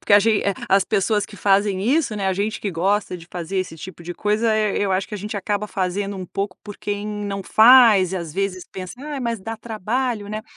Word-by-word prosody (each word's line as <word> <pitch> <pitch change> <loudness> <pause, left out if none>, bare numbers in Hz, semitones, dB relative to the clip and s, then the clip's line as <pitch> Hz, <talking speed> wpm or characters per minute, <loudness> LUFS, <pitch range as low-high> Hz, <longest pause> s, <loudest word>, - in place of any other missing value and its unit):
porque - - -1
a - - +10
eh, 205 -2 +2
as 195 0 +4
pessoas 205 +1 +1
que 205 - -12
fazem 195 -1 +2
isso, 265 +1 +1
né, 200 -2 -2
a 190 - +2
gente 205 +3 -2
que 205 - -2
gosta 190 +2 0
de 165 - -13
fazer 175 +2 -5
esse 185 -3 -2
tipo 180 +1 -9
de 175 +1 -5
coisa, 215 +3 +1
eh, 215 -2 +1
eu 195 -2 +1
acho 190 +1 -1
que - - -6
a 210 - -4
gente 210 +2 -5
acaba 205 +1 -2
fazendo 195 +1 -2
um 185 - -6
pouco 195 +1 -3
por 205 -1 -9
quem 205 0 -4
não 205 -2 -4
faz 220 -6 +6
e, - - -1
às 170 -3 -5
vezes, 190 0 -2
pensa: 185 -1 -7
"Ah, 290 0 -5
mas 235 -3 -2
dá 225 +3 -5
trabalho, 225 0 -2
né.". 215 +1 -4
205 Hz, 240 wpm, -22 LUFS, 190-215 Hz, -, a